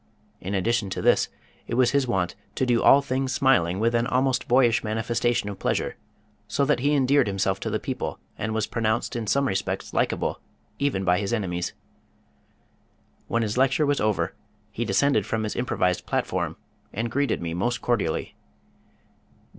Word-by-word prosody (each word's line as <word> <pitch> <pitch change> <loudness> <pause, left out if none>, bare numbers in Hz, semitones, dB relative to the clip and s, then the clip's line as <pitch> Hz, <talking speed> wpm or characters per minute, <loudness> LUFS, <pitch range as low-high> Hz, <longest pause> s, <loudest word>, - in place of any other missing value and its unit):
In 95 +2 -4
addition 100 +1 0
to - - -3
this - - +3 0.4
it 115 - -2
was 125 -1 +4
his 140 -2 +2
wont 95 -7 0 0.2
to 130 - +1
do 120 -2 +2
all 140 +1 +6
things 130 -1 -1
smiling 95 -11 +2
with 115 +2 +2
an 120 0 +1
almost 130 0 +1
boyish 120 -2 +4
manifestation 115 +1 0
of 100 -2 -6
pleasure, - - -1 0.5
so 140 - +1
that 150 -1 +2
he 145 +3 +2
endeared 140 -2 +3
himself 95 -1 0
to - - -3
the - - -1
people - - -4 0.2
and 110 - -3
was 110 -1 0
pronounced 115 +1 -1
in 115 -2 -3
some 140 +5 +2
respects 95 -2 -2
likeable - - 0 0.4
even 140 -9 0
by 90 0 +3
his 100 +1 -2
enemies. 90 -6 -2 1.5
When 115 0 0
his 110 +3 -1
lecture 135 +3 +3
was 145 0 +1
over 95 -5 0 0.4
he 120 +3 -3
descended 110 +2 +2
from 110 -1 -1
his 105 - -3
improvised 90 -7 0
platform - - -1 0.3
and 115 +2 -3
greeted 140 0 0
me 85 -1 -4
most 120 +8 -1
cordially. 105 -10 -1
115 Hz, 170 wpm, -25 LUFS, 95-130 Hz, 1.5 s, all